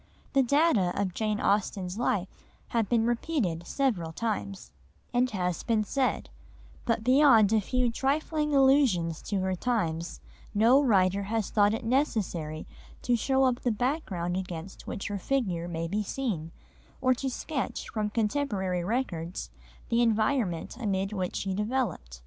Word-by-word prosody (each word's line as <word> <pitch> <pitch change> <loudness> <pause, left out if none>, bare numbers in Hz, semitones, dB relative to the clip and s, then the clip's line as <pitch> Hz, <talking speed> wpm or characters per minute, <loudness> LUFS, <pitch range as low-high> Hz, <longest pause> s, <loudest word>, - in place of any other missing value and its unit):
The 275 - +5
data 255 - +2
of 190 -3 -1
Jane 215 0 -1
Austen's 195 -2 0
life 200 -6 0 0.4
have 230 -4 0
been 230 -2 +3
repeated 230 - -1
several 215 - 0
times, 200 0 -4 0.4
as 250 +1 +2
has 180 -5 -2
been 225 -2 +1
said, 260 +5 -1 0.5
but 230 -2 0
beyond 250 -5 +5
a 220 - +4
few 250 +3 0
trifling 300 +4 0
allusions 265 - +3
to 200 -2 -2
her 190 0 0
times 170 - -2 0.4
no 235 +7 +5
writer 200 -6 +3
has 220 0 -2
thought 205 0 +3
it 230 - -6
necessary 200 - -1 0.4
to 245 - +2
show 265 +3 +2
up 255 -1 +2
the 245 - +1
background 215 - -1
against 185 -1 -6
which 195 - -5
her 205 -1 -3
figure 185 -8 -1
may 165 -1 -3
be 205 +5 -1
seen, 205 -8 -3 0.5
or 255 0 +3
to 265 +2 -3
sketch 270 +2 -4
from 215 -2 -2
contemporary 210 -6 -1
records 180 -6 -3 0.4
the 235 0 +3
environment 220 -6 +1
amid 195 -3 -1
which 185 -3 -3
she 195 -1 -2
developed. 210 - -2
215 Hz, 145 wpm, -28 LUFS, 185-255 Hz, 0.5 s, The